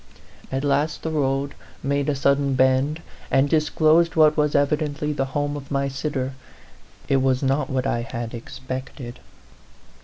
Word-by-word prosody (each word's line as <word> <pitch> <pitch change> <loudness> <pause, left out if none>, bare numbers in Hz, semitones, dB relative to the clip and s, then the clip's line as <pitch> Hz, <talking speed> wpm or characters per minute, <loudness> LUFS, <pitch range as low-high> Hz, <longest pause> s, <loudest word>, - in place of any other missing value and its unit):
At 135 +1 -1
last 145 +2 0
the 160 - -2
road 140 -2 0 0.3
made 140 +1 0
a 145 - +1
sud 140 +1 +3
den 140 -1 0
bend, 130 +5 +2 0.3
and 135 +1 +3
disclosed 160 +2 +3
what 155 -1 +5
was 150 -1 +1
evidently 150 +1 +1
the 135 -2 -1
home 145 0 -1
of 140 -1 -8
my 140 -1 0
sitter. 135 -1 -3 0.7
It 135 - +3
was 130 0 +1
not 135 +1 +1
what 130 -1 -1
I 120 -3 0
had 115 0 -5
expected. 130 +1 -7
140 Hz, 155 wpm, -23 LUFS, 130-150 Hz, 0.7 s, what